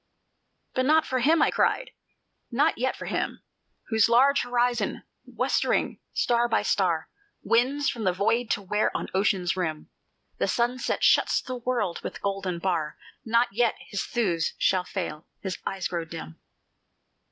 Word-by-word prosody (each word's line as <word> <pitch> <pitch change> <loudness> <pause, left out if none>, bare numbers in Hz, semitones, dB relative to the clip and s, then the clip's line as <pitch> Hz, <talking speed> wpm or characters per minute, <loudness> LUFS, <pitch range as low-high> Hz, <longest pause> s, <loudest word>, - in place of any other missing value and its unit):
"But 255 0 +1
not 315 +1 +4
for 260 - -1
him," 310 +5 +4
I - - +3
cried, - - +1 0.6
"not 280 +4 +1
yet 260 +2 0
for - - -8
him, - - -3 0.5
Whose 220 0 +3
large 270 +4 +5
horizon, 245 0 0 0.2
westering, - - 0
star 240 0 +2
by 225 - +2
star 180 -6 +1 0.4
Wins 265 +5 +2
from 230 - -2
the 185 - +4
void 225 +6 0
to 205 - 0
where 210 +3 +1
on - - -5
Ocean's 190 -2 +1
rim 160 -4 -3 0.5
The - - +1
sunset 245 +1 0
shuts - - +4
the 255 - -6
world 235 -7 -1
with - - -6
golden 195 -3 -2
bar, 170 -4 -1 0.3
Not 235 +2 +2
yet 235 +1 +2 0.2
his 200 - -1
thews 180 -9 -1
shall 185 -1 +2
fail, 170 -5 -5
his 190 -2 -4
eye 195 -1 -4
grow 170 -2 -3
dim! 80 - -9
220 Hz, 150 wpm, -26 LUFS, 185-245 Hz, 0.6 s, large